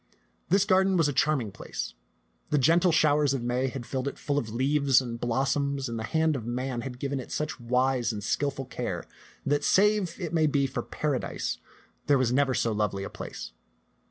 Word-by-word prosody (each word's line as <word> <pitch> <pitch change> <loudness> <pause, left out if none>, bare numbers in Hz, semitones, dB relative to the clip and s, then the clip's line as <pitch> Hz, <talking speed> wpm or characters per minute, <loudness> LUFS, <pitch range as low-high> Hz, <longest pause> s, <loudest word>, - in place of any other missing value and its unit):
This 195 +2 +4
garden 190 -1 +3
was 165 -3 +4
a 145 - -1
charming 140 -6 +1
place. - - -6 0.6
The 150 - +2
gentle 165 +6 +4
showers 150 -3 +3
of 125 - -3
May 125 +2 0
had 130 -1 -5
filled 130 +1 -3
it 140 - -4
full 145 0 0
of 115 - -5
leaves 135 +3 +3
and 120 -3 -5
blos 130 +3 +1
soms, 140 -1 -1
and 115 -1 -4
the - - -3
hand 160 +4 +1
of 125 - -4
man 125 +1 -3
had 125 0 -6
given 140 +1 -2
it 125 - -8
such 150 -2 -3
wise 125 0 +1
and 105 -2 -5
skillful 140 +3 -1
care - - -4 0.4
that 145 +1 +1
save, 200 -1 +3
it 170 -3 -4
may 160 -2 +3
be, 140 -1 +2
for 135 - -3
Paradise, 145 -4 -2 0.5
there 145 - +5
was 125 -2 +1
never 135 -1 +2
so 115 - +1
lovely 105 -2 -1
a - - -6
place. - - -7
135 Hz, 200 wpm, -28 LUFS, 125-150 Hz, 0.6 s, there